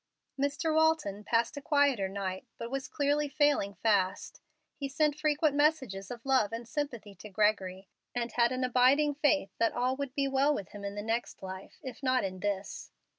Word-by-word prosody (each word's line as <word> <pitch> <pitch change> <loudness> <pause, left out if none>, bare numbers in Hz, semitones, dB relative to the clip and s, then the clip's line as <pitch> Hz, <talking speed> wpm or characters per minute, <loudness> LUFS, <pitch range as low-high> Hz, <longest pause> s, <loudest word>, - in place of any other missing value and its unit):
Mr. 285 +3 0
Walton 315 -11 +2
passed 230 +4 0
a - - -4
quieter 280 -9 +2
night, 190 +3 -4
but 230 +1 -6
was 270 0 -3
clearly 290 +1 0
failing 290 -9 +2
fast. 200 -4 0 0.3
He 275 -1 -4
sent 295 +1 +1
frequent 305 -1 +1
messages 265 -11 +1
of 240 0 -8
love 260 -6 +3
and 230 0 -6
sympathy 235 -6 -4
to 205 +3 -11
Gregory, 195 -2 0 0.3
and 235 -1 -2
had 235 +1 +3
an 255 0 -1
abiding 255 +4 +4
faith 290 -7 +1
that 230 - +2
all 250 +2 0
would 280 -2 -4
be 280 -2 +1
well 275 +2 +2
with 200 - -5
him 205 -1 -10
in 200 0 -4
the 205 - -4
next 225 -1 -3
life, 190 0 -8
if 260 +1 -8
not 255 -1 +2
in 185 -1 -4
this. 200 0 -3
250 Hz, 185 wpm, -30 LUFS, 205-285 Hz, 0.3 s, abiding